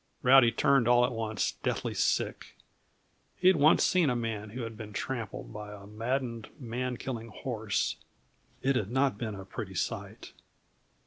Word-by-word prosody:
Rowdy 130 Hz, -2 st, +7 dB
turned 135 Hz, +1 st, +3 dB
all 120 Hz, 0 st, +6 dB
at -, -, -2 dB
once 110 Hz, -2 st, -1 dB
deathly -, -, -1 dB
sick. -, -, -1 dB, 0.8 s
He 185 Hz, -, +5 dB
had 190 Hz, -, +5 dB
once 155 Hz, +3 st, +5 dB
seen 180 Hz, -5 st, +3 dB
a 125 Hz, -, +1 dB
man 110 Hz, -3 st, -3 dB
who 120 Hz, +3 st, -5 dB
had 115 Hz, -1 st, -6 dB
been 105 Hz, -1 st, -8 dB
trampled 115 Hz, -3 st, -4 dB
by 105 Hz, 0 st, -7 dB
a 100 Hz, -1 st, -11 dB
maddened, 115 Hz, +2 st, -3 dB
man 125 Hz, 0 st, -3 dB
killing 115 Hz, -3 st, -5 dB
horse. 110 Hz, -2 st, -2 dB, 0.7 s
It 135 Hz, +1 st, +2 dB
had 105 Hz, -5 st, 0 dB
not 130 Hz, -3 st, +1 dB
been 110 Hz, -3 st, -3 dB
a 95 Hz, -1 st, -8 dB
pretty -, -, -6 dB
sight. -, -, -4 dB
115 Hz, 165 wpm, -30 LUFS, 110-130 Hz, 0.8 s, Rowdy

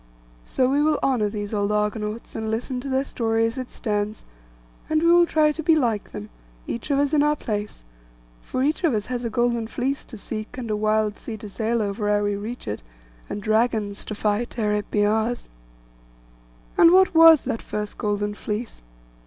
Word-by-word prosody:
So 255 Hz, -, +1 dB
we 280 Hz, +3 st, +2 dB
will 305 Hz, 0 st, +3 dB
honour 240 Hz, -6 st, +2 dB
these 205 Hz, 0 st, -5 dB
old 205 Hz, 0 st, 0 dB
Argonauts, 210 Hz, +1 st, -2 dB
and 220 Hz, -1 st, -3 dB
listen 250 Hz, +3 st, -2 dB
to 275 Hz, -, -6 dB
their 265 Hz, 0 st, +1 dB
story 225 Hz, -4 st, 0 dB
as 230 Hz, +3 st, -2 dB
it 255 Hz, -, -5 dB
stands; 210 Hz, -1 st, -3 dB, 0.6 s
and 315 Hz, 0 st, +2 dB
we 335 Hz, -, +5 dB
will 345 Hz, 0 st, +6 dB
try 305 Hz, -2 st, +3 dB
to 320 Hz, -, -5 dB
be 320 Hz, +1 st, +4 dB
like 230 Hz, -8 st, 0 dB
them, 105 Hz, +1 st, -8 dB, 0.3 s
each 235 Hz, +5 st, -5 dB
of 280 Hz, -, +2 dB
us 285 Hz, +1 st, +1 dB
in 295 Hz, -, +4 dB
our 295 Hz, +1 st, +3 dB
place; 210 Hz, -, -4 dB, 0.6 s
for 255 Hz, -, -2 dB
each 305 Hz, +5 st, 0 dB
of 310 Hz, -9 st, +3 dB
us 210 Hz, -1 st, -1 dB
has 245 Hz, 0 st, -3 dB
a 235 Hz, -, -1 dB
Golden 235 Hz, 0 st, 0 dB
Fleece 270 Hz, +4 st, -2 dB
to 230 Hz, -, -10 dB
seek, 215 Hz, +3 st, -6 dB
and 235 Hz, -4 st, -4 dB
a -, -, +1 dB
wild 215 Hz, 0 st, +1 dB
sea 220 Hz, -, -6 dB
to 210 Hz, -, -9 dB
sail 225 Hz, +2 st, -1 dB
over 205 Hz, +1 st, -2 dB
ere 205 Hz, 0 st, +2 dB
we 205 Hz, 0 st, 0 dB
reach 215 Hz, -, -6 dB
it, 105 Hz, -, -3 dB, 0.5 s
and 205 Hz, -, -5 dB
dragons 215 Hz, -2 st, +1 dB
to 215 Hz, -, -5 dB
fight 210 Hz, +4 st, -1 dB
ere 210 Hz, -2 st, +1 dB
it 210 Hz, 0 st, -2 dB
be 205 Hz, -1 st, +2 dB
ours. 220 Hz, +3 st, 0 dB, 1.3 s
And 335 Hz, -, +9 dB
what 375 Hz, +1 st, +5 dB
was 325 Hz, -2 st, +8 dB
that 240 Hz, -3 st, -3 dB
first 210 Hz, -1 st, -5 dB
Golden 205 Hz, 0 st, -1 dB
Fleece? 210 Hz, +2 st, -5 dB
225 Hz, 200 wpm, -24 LUFS, 210-265 Hz, 1.3 s, And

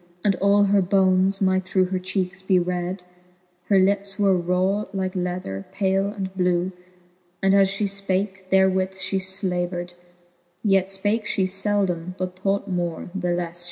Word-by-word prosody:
And 200 Hz, -2 st, +3 dB
all 200 Hz, +1 st, +4 dB
her 200 Hz, 0 st, +3 dB
bones 190 Hz, +1 st, +2 dB
might 190 Hz, 0 st, +2 dB
through 185 Hz, 0 st, +1 dB
her 185 Hz, -, 0 dB
cheekes 185 Hz, 0 st, -3 dB
be 190 Hz, 0 st, +2 dB
red:. 180 Hz, +1 st, -2 dB, 0.6 s
Her 200 Hz, -, +3 dB
lips 195 Hz, +1 st, +1 dB
were 200 Hz, -2 st, +3 dB
hke 175 Hz, -2 st, -1 dB
raw 190 Hz, +3 st, +1 dB, 0.4 s
lether, 175 Hz, -, -4 dB
pale 195 Hz, 0 st, +1 dB
and 195 Hz, -2 st, -5 dB
blew, 180 Hz, 0 st, +1 dB, 0.7 s
And 195 Hz, 0 st, +4 dB
as 195 Hz, -1 st, +5 dB
fhe 195 Hz, +2 st, -2 dB
fpake, 195 Hz, -1 st, -2 dB
therewith 190 Hz, 0 st, +2 dB
fhe 190 Hz, 0 st, -2 dB
flavered; 180 Hz, -2 st, -1 dB, 0.7 s
Yet 195 Hz, -3 st, +3 dB
fpake 205 Hz, +3 st, 0 dB
fhe 195 Hz, -, 0 dB
feldom, 185 Hz, -3 st, -1 dB
but 185 Hz, -1 st, -4 dB
thought 195 Hz, +1 st, 0 dB
more, 175 Hz, -2 st, -3 dB
the 190 Hz, -2 st, -2 dB
lefle -, -, 0 dB
flie 175 Hz, 0 st, 0 dB
fed. 170 Hz, -, -9 dB
190 Hz, 160 wpm, -23 LUFS, 180-195 Hz, 0.7 s, as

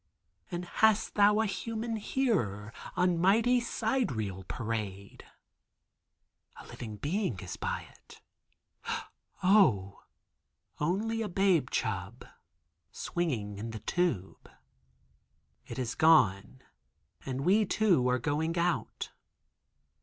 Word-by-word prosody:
And 175 Hz, -2 st, -4 dB
hast 220 Hz, +3 st, +2 dB
thou 210 Hz, +1 st, +5 dB
a -, -, +1 dB
human 225 Hz, +2 st, -3 dB
hearer 150 Hz, -, -1 dB, 0.2 s
on 180 Hz, -2 st, +2 dB
mighty 225 Hz, +7 st, +4 dB
sidereal 175 Hz, -, -1 dB
parade?" 105 Hz, -3 st, -5 dB, 1.3 s
A -, -, -12 dB
living 110 Hz, -3 st, -8 dB
being 145 Hz, -, -2 dB
is 90 Hz, -1 st, -6 dB
by -, -, -3 dB
it. -, -, -18 dB, 1.2 s
(Oh, 130 Hz, -, +4 dB, 0.8 s
only 215 Hz, +9 st, 0 dB
a 215 Hz, -, -2 dB
babe 180 Hz, -8 st, +2 dB
chub 110 Hz, +1 st, -3 dB, 0.7 s
swinging 115 Hz, -, -3 dB
in 115 Hz, +2 st, -5 dB
the 110 Hz, -1 st, -6 dB
tube.) 130 Hz, -, -2 dB, 1.2 s
It -, -, -7 dB
is 125 Hz, -3 st, -2 dB
gone, 130 Hz, -7 st, +3 dB, 0.6 s
and 130 Hz, 0 st, -3 dB
we 195 Hz, +8 st, +4 dB
too 180 Hz, -15 st, +3 dB
are 125 Hz, -, +2 dB
going 155 Hz, +6 st, -1 dB
out. 170 Hz, 0 st, -1 dB
165 Hz, 100 wpm, -30 LUFS, -, 1.3 s, thou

